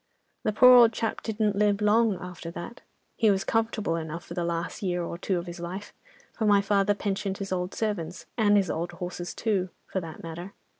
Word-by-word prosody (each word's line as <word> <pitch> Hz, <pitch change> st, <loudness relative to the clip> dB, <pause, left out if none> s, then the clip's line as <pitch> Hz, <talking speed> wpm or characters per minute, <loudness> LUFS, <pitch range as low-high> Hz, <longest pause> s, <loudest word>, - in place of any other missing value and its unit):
"The 215 Hz, -, 0 dB
poor 250 Hz, +4 st, +8 dB
old 235 Hz, -2 st, +8 dB
chap 225 Hz, 0 st, -2 dB
didn't 215 Hz, -2 st, 0 dB
live 205 Hz, 0 st, +2 dB
long 210 Hz, -1 st, +3 dB
after 180 Hz, -2 st, -7 dB
that. 175 Hz, +8 st, -8 dB, 0.4 s
He 220 Hz, -, +4 dB
was 195 Hz, -1 st, +2 dB
comfortable 225 Hz, -6 st, 0 dB
enough 165 Hz, +1 st, -5 dB
for -, -, -8 dB
the 175 Hz, -, -2 dB
last 170 Hz, +4 st, -3 dB
year 180 Hz, -3 st, -1 dB
or 170 Hz, -, -4 dB
two 185 Hz, +1 st, -1 dB
of 170 Hz, -, -4 dB
his 175 Hz, 0 st, -8 dB
life, 185 Hz, +4 st, -6 dB, 0.4 s
for 220 Hz, -, -1 dB
my 205 Hz, -1 st, +6 dB
father 200 Hz, 0 st, +2 dB
pensioned 195 Hz, -1 st, -2 dB
his 195 Hz, -1 st, -5 dB
old 180 Hz, 0 st, -2 dB
servants, 185 Hz, -6 st, -3 dB
and 205 Hz, -3 st, +4 dB
his 195 Hz, -4 st, +1 dB
old 175 Hz, +2 st, -3 dB
horses 175 Hz, -1 st, -5 dB
too, 195 Hz, -5 st, 0 dB, 0.2 s
for 190 Hz, -, -3 dB
that 165 Hz, -2 st, -9 dB
matter. 170 Hz, +4 st, -7 dB
195 Hz, 205 wpm, -27 LUFS, 175-210 Hz, 0.4 s, poor